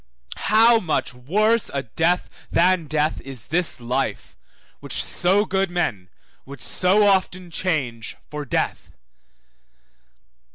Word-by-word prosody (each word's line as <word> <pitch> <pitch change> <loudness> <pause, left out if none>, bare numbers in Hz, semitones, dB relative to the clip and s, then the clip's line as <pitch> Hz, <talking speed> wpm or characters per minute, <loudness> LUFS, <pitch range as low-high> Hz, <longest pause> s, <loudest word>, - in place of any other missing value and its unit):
How 225 +2 +5
much 160 -9 -2
worse 210 - +1
a 140 -1 -2
death 165 +9 -1
than 180 -2 +2
death 155 +1 0
is 130 -5 -7
this 170 -3 +1
life, 120 -2 -3 0.4
which - - -1
so 195 +4 +2
good 190 -1 0
men 110 - -2 0.3
would 140 0 -11
so 190 - +2
often 185 -2 +1
change 135 -11 -2
for 150 0 -6
death! 130 - -3
170 Hz, 115 wpm, -22 LUFS, 135-190 Hz, 0.4 s, How